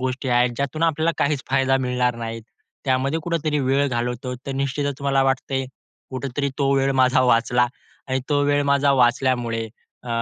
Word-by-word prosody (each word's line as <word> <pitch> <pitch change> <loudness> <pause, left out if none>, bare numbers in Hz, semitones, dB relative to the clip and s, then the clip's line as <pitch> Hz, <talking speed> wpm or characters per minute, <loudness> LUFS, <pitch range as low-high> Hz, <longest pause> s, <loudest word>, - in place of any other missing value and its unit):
गोष्टी 130 +1 -3
आहेत, 120 0 +3
ज्यातून 140 +3 -2
आपल्याला 160 0 +2
काहीच 140 -2 0
फायदा 135 0 +3
मिळणार 125 -1 0
नाहीत, 115 -1 -5 0.4
त्यामध्ये 135 +4 +1
कुठेतरी 160 -2 -1
वेळ 135 +1 +2
घालवतो. 125 +1 -3
तर 135 - -3
निश्चितच 140 0 -3
मला 135 -1 +2
वाटत 135 0 -1 0.6
कुठेतरी 135 +2 -3
तो 140 -1 +1
वेळ 135 0 +2
माझा 130 0 +4
वाचला 125 0 +3 0.4
आणि 130 0 0
तो 145 - +2
वेळ 145 0 +2
माझा 140 0 +3
वाचल्यामुळे 120 -2 +1 0.4
अ, 125 - -10
135 Hz, 160 wpm, -22 LUFS, 125-140 Hz, 0.6 s, माझा